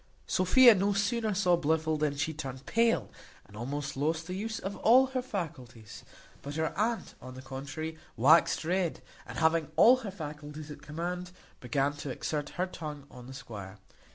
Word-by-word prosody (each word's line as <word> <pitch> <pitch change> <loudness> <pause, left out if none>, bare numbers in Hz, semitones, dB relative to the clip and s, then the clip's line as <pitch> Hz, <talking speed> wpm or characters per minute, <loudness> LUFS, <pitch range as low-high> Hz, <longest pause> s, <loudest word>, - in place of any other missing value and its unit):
Sophia 235 +7 +6
no 200 +1 +1
sooner 215 +2 0
saw 185 -3 +3
Blifil 160 -1 +1
than 150 -2 -1
she 160 +3 -1
turned 135 -3 -7
pale, 225 - +1 0.3
and 105 - -16
almost 140 +5 -4
lost 160 +4 -1
the 180 - -5
use 220 +4 -3
of 195 +2 -5
all 255 +4 +6
her 260 -1 -2
faculties; 130 - -7 0.4
but 145 +1 -7
her 160 0 -1
aunt, 225 +3 -1
on 130 0 -9
the 130 - -8
contrary, 140 +4 -6 0.2
waxed 155 +6 +5
red, 180 -1 -1 0.2
and, - - -7
having 160 -1 +2
all 235 +10 +7
her 230 -5 -6
faculties 150 -3 -8
at 145 0 -10
command, 175 +4 -4 0.3
began 135 +3 0
to 145 -1 -7
exert 145 +3 -3
her 180 - +1
tongue 150 -6 -7
on 125 -1 -11
the 135 - -9
squire. 105 -7 -9
160 Hz, 175 wpm, -30 LUFS, 140-190 Hz, 0.4 s, all